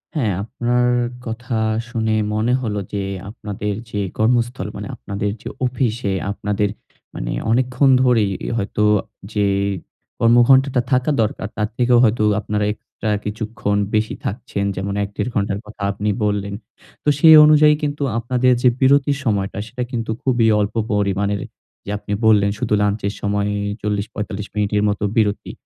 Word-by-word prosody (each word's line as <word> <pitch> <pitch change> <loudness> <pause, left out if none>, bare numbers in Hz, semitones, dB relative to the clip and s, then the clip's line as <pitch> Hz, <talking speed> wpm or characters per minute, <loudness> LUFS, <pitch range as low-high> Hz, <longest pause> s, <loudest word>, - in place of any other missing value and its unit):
হ্যাঁ 115 -10 +1
আপনার 120 +1 0 0.4
কথা 120 +1 -4 0.3
শুনে 110 -2 0 0.2
মনে 110 +3 +1
হলো 105 -4 -2
যে, 100 -1 -1 0.3
আপনাদের 105 -2 -4 0.2
যে 105 - -2 0.2
কর্মস্থল 120 +2 +1
মানে - - -6
আপনাদের 100 +9 -3
যে - - -6 0.2
অফিসে 120 -5 -1 0.2
আপনাদের 105 0 -1 0.5
মানে - - -4 0.2
অনেকক্ষণ 130 +3 +2
ধরেই 115 -6 +3 0.3
হয়তো 105 0 -1 0.5
যে 105 -1 +2 0.7
কর্মঘন্টা 120 +4 +5
টা 125 - +4
থাকা 130 +3 +2
দরকার 105 -1 -2
তার 105 -1 0
থেকেও 125 -1 +4
হয়তো 110 -1 +3 0.2
আপনারা 105 0 -1
এক্সট্রা 110 0 -7 0.2
কিছুক্ষণ 105 0 -2 0.2
বেশি 110 0 0
থাকছেন। 100 -2 -3
যেমন 100 +1 -3
১-১.৫ 100 +4 -3
ঘন্টার 100 -1 0
কথা 105 -1 -9
আপনি 105 +1 -2 0.2
বললেন। 100 -1 -1 0.5
তো - - +2
সেই 160 +1 +9
অনুযায়ী 150 0 +6
কিন্তু 145 0 -2
আপনাদের 125 +2 +2
যে 125 - +7
বিরতির 140 +1 +3
সময়টা, 100 -4 -1
সেটা 125 +2 -4
কিন্তু 115 -3 -2
খুবই 120 -4 +2
অল্প 105 +2 -1 0.2
পরিমাণের। 100 -1 0 0.4
যে - - -7
আপনি 105 0 -5
বললেন 105 -2 +5
শুধু - - -1
লাঞ্চ 105 +1 0
এর 100 - -2
সময়ে 100 0 0 0.3
৪০-৪৫ 105 0 -3
মিনিটের 105 0 +1
মতো 105 0 -2
বিরতি। 105 -2 0
110 Hz, 145 wpm, -20 LUFS, 105-125 Hz, 0.7 s, সেই